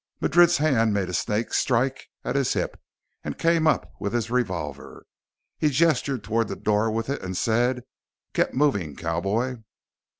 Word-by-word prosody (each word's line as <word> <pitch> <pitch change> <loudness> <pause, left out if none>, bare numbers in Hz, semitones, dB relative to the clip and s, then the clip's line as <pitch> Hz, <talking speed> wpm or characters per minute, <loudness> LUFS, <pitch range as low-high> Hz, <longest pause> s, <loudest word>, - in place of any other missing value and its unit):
Madrid's 175 +2 +5
hand 120 -8 +2
made 95 -3 -1
a - - -5
snake 105 +6 -1
strike 130 +2 +1 0.2
at 125 - -2
his 140 -2 +2
hip - - -3 0.4
and - - -5
came 165 -1 +2
up 155 - +1
with 100 +1 -3
his 115 -1 -1
revolver. 90 - -3 0.5
He 150 - +3
gestured 140 -4 +1
toward 115 +1 0
the - - -4
door 105 +1 +1
with 115 +1 -2
it 140 - -3
and 95 -1 -4
said, 120 +2 +1 0.5
"Get - - 0
moving, 100 - +1
cowboy." 100 +10 -1
115 Hz, 160 wpm, -25 LUFS, 105-135 Hz, 0.5 s, Madrid's